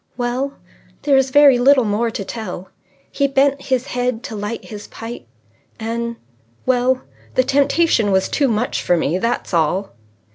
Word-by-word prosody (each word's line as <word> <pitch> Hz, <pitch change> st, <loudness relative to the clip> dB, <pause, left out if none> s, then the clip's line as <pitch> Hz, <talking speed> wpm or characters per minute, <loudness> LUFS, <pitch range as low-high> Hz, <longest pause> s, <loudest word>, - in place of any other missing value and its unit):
"Well, 250 Hz, +3 st, -2 dB, 0.5 s
there 285 Hz, -2 st, +3 dB
is 265 Hz, 0 st, +3 dB
very 280 Hz, -2 st, +6 dB
little 265 Hz, +1 st, +5 dB
more 220 Hz, +2 st, 0 dB
to 205 Hz, -3 st, -5 dB
tell. 190 Hz, -5 st, -6 dB, 0.4 s
He 280 Hz, -, +1 dB
bent 275 Hz, +1 st, +2 dB
his 260 Hz, -1 st, -1 dB
head 245 Hz, -2 st, -2 dB
to 220 Hz, -, -6 dB
light 210 Hz, +2 st, -5 dB
his 210 Hz, -1 st, -9 dB
pipe, 230 Hz, +2 st, -8 dB, 0.5 s
and 235 Hz, +1 st, -3 dB, 0.5 s
well 255 Hz, 0 st, +2 dB, 0.3 s
the 255 Hz, -, +4 dB
temptation 280 Hz, -4 st, +2 dB
was 190 Hz, 0 st, +2 dB
too 285 Hz, -, +1 dB
much 230 Hz, 0 st, -1 dB
for 175 Hz, -, +2 dB
me. 165 Hz, +2 st, 0 dB
That's 230 Hz, -2 st, -2 dB
all." 170 Hz, +4 st, +1 dB
245 Hz, 155 wpm, -19 LUFS, 215-270 Hz, 0.5 s, very